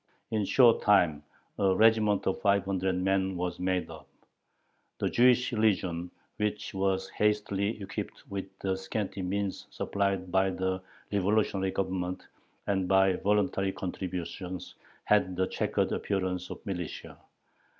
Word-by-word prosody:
In 110 -1 +1
a - - 0
short 120 -4 +5
time 90 -8 +4 0.4
a 95 -2 +3
regiment 110 -1 +4
of 95 - -1
five 100 -2 +3
hundred 95 -1 0
men 95 0 +1
was 90 0 -3
made 90 0 0
up. 80 -4 -11 0.9
The - - 0
Jewish 125 0 +4
legion, 95 -6 +1 0.3
which 105 0 -2
was 95 0 0
hastily 105 0 0
equipped 100 -2 -6
with 100 -1 -4 0.2
the 95 -1 0
scanty 95 +1 -3
means 100 +1 -2
supplied 100 -2 -1
by 95 +1 +3
the 95 0 -2 0.3
revolutionary 100 -1 +1
Government 95 -1 -2 0.4
and 95 -2 0
by 95 0 +4
voluntary 100 -1 +1
contributions, 90 0 -5 0.3
had 100 -3 +2
the 95 +1 +1
checkered - - -1
appearance 95 -2 -2
of - - -9
militia. 90 -5 -5
95 Hz, 130 wpm, -29 LUFS, 95-100 Hz, 0.9 s, short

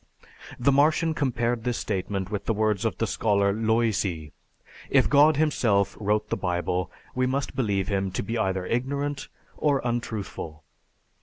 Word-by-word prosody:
The 135 +3 +3
Martian 155 +3 +3
compared 120 -5 -1
this 125 -1 -1
statement 95 -1 -3
with 105 -2 -3
the 115 - 0
words 110 -1 +1
of 115 - -1
the 115 - 0
scholar 100 -3 +1
Loisy, 110 -8 0 0.6
"If 130 -2 +4
God 145 +1 +5
himself 120 -10 +2
wrote 105 0 0
the - - +2
Bible, 90 0 -1 0.2
we 130 0 +1
must 135 +2 -2
believe 100 -6 0
Him 95 -2 0
to - - -2
be 115 +4 -3
either 95 -4 0
ignorant 140 +5 -2 0.3
or 145 -3 +2
untruthful." 110 -10 -4
110 Hz, 150 wpm, -26 LUFS, 100-130 Hz, 0.6 s, God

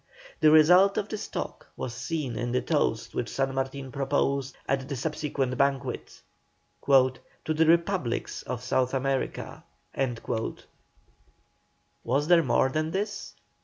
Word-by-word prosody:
The 155 - +6
result 180 +6 +6
of 205 - -1
this 215 - -4
talk - - -6
was 120 - -4
seen 135 0 -3
in 120 0 -2
the 125 - +2
toast 145 -8 0
which 120 - -2
San 135 0 -1
Martin 135 0 -3
proposed 140 -1 -1
at 135 0 -1
the 140 - -2
subsequent 140 -2 -2
banquet: 140 -2 -1 0.7
"To 130 +3 +2
the 160 +1 +3
REPUBLICS 170 -6 +1
of 125 -1 -5
South 130 +1 +1
America." 135 0 -2 2.4
Was 140 +5 0
there 175 -1 +6
more 130 -2 +2
than 155 +3 -1
this? 205 +4 -4
140 Hz, 130 wpm, -27 LUFS, 130-160 Hz, 2.4 s, The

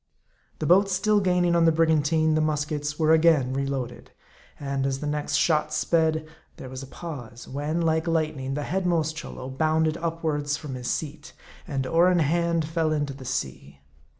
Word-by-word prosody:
The - - -3
boat 195 +5 +5
still 205 +3 +2
gaining 180 -2 +2
on 170 -1 +4
the 165 - +6
brigantine, 160 0 +2
the 155 - +2
muskets 150 -1 -2
were 160 -1 +4
again 155 -5 +4
reloaded. 135 -2 -3 0.5
And 140 -1 -2
as 135 0 -2
the 150 - -5
next 150 0 -2
shot 155 0 +2
sped, 160 -2 +1 0.3
there 130 - -8
was 130 0 -7
a 135 - -9
pause; 125 -7 -8
when, 150 +5 -2
like 160 0 +1
lightning, 155 -5 -1
the 150 - -2
headmost 170 -3 0
Cholo 160 -5 -7
bounded 155 +3 +1
upwards 155 -3 -2
from 150 -4 -7
his 125 -1 -4
seat, 150 -1 -4 0.3
and 135 -5 -2
oar 170 +6 +4
in 180 - +3
hand, 170 +1 +1
fell 160 -1 0
into 145 -2 -1
the 135 -1 -11
sea. 70 - -5
155 Hz, 175 wpm, -25 LUFS, 140-165 Hz, 0.5 s, the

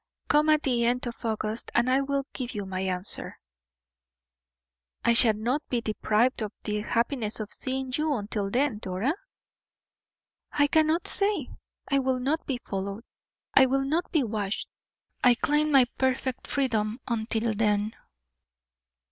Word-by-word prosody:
Come 300 +1 +4
at 305 -1 +4
the 245 -3 +1
end 245 +2 +1
of 240 -1 -7
August, 220 0 -2
and 235 +1 +3
I 260 +2 +3
will 275 0 -1
give 255 -2 -5
you 205 -1 -3
your 190 0 -7
answer." 185 0 -2 1.7
"I 235 - +5
shall 230 -2 +7
not 240 +7 -1
be 245 - +1
deprived 225 +2 +1
of 210 -2 -3
the 210 -1 -2
happiness 230 0 -1
of 215 -1 -5
seeing 260 0 -2
you 305 0 0
until 205 -2 -3
then, 250 0 0
Dora?" 195 +9 -1 1.4
"I 290 - +3
cannot 315 +3 +2
say; 400 - +1 0.4
I 275 - +4
will 260 -1 +1
not 280 +6 -1
be 265 - -1
followed, 200 +2 -4 0.5
I 265 - +7
will 270 +1 +1
not 315 +6 -1
be 310 -5 +2
watched. 210 -3 -2 0.6
I 245 -1 +7
claim 300 +5 +1
my 270 -3 +7
perfect 260 0 -1
freedom 225 -5 0
until 225 -1 -1
then." 210 0 +1
245 Hz, 150 wpm, -27 LUFS, 215-275 Hz, 1.7 s, shall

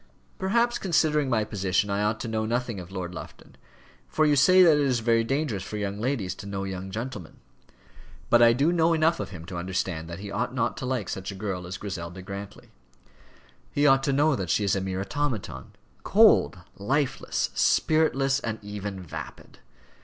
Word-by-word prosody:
"Perhaps, 235 +5 +1
considering 150 -5 +1
my 110 -3 +2
position, 100 -1 -1
I 100 +1 0
ought 105 +1 0
to - - -4
know 110 -1 -1
nothing 115 -1 -2
of 90 -1 -9
Lord 90 -2 -5
Lufton, - - -11 0.5
for 155 - +1
you 150 -1 +4
say 185 +7 +6
that 160 -4 +6
it - - +2
is 130 -3 +1
very 115 0 +2
dangerous 135 -4 -1
for 105 +2 -6
young 100 0 -3
ladies 115 -6 -1
to 100 - -9
know 100 -1 -4
young 95 0 -5
gentlemen. 110 -4 -6 0.9
But 120 - +6
I 115 0 +8
do 140 +7 +2
know 165 -1 +3
enough 165 +1 +2
of - - -4
him 80 -4 -9
to 90 0 -7
understand 85 -2 -3
that 85 - -6
he 100 +1 -8
ought 125 +5 -2
not 125 - 0
to 130 -6 -4
like 125 -7 -2
such 95 +1 -5
a - - -8
girl 95 -3 -4
as 90 +1 -5
Griselda 90 -2 -6
Grantly. 100 +1 -8 1.0
He 145 - +1
ought 135 -2 +5
to 140 - 0
know 145 +2 +3
that 95 -6 -4
she 105 - +2
is 100 - +2
a 95 - -1
mere 95 0 -3
automaton, 100 - -4 0.3
cold, - - +5 0.2
lifeless, 135 +7 -1
spiritless, 140 -4 +2
and 110 -5 -4
even 105 -1 -6
vapid. 80 - -9
110 Hz, 190 wpm, -26 LUFS, 95-140 Hz, 1.0 s, I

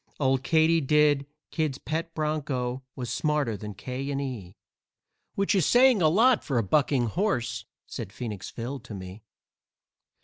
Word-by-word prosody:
Old 135 -2 +2
Katydid, 150 -2 +3 0.2
Kid's 155 -5 -1
pet 165 +3 -4
bronco, 140 -5 -2
was 125 -2 -5
smarter 150 -7 0
than 105 0 -7
'K. 125 +7 -5
& 140 0 -2
E.,' 115 -9 -6 0.8
Which 200 0 +1
is 190 -4 +3
saying 245 -4 +5
a 160 - +5
lot 230 +7 +4
for 135 - -1
a 115 - +2
bucking 135 +3 +2
horse," 120 - -1 0.2
said - - -7
Phoenix 105 -4 -6
Phil 125 +4 -5
to 115 -3 -9
me. 95 +2 -9
140 Hz, 145 wpm, -27 LUFS, 120-155 Hz, 0.8 s, saying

